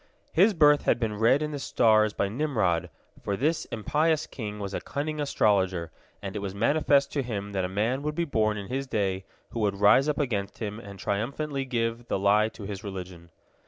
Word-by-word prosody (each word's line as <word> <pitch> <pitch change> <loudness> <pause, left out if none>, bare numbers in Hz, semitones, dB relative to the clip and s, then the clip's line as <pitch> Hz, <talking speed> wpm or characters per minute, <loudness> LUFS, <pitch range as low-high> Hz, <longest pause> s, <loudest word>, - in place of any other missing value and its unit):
His 200 +5 +4
birth 150 -2 +5
had 120 - +3
been 110 -3 -2
read 130 +6 +4
in 150 - -3
the 145 - -4
stars 110 -5 +3
by 100 - -1
Nimrod, 105 - 0 0.3
for 100 -1 -2
this 155 +7 0
impious 155 +8 0
king 105 -4 -6
was 100 -1 -5
a - - -3
cunning 150 +2 -3
astrologer, 95 - +1 0.3
and 95 0 -5
it - - -2
was 100 -1 -5
manifest 140 +5 +2
to 145 - 0
him 100 -5 -4
that 95 -2 -1
a - - -3
man 110 +8 0
would 150 +1 -3
be 170 - 0
born 110 -7 +1
in 100 - -5
his 135 +6 -3
day 95 -5 -1 0.3
who 115 - -4
would 100 -2 0
rise 130 +8 +5
up 150 - 0
against 105 -9 -2
him 105 -1 -5
and 100 -3 -10
triumphantly 135 +9 -2
give 115 -1 -2
the - - 0
lie 105 +2 +3
to 110 - -11
his 100 +1 -6
religion. 90 -4 -8
110 Hz, 205 wpm, -27 LUFS, 100-140 Hz, 0.3 s, birth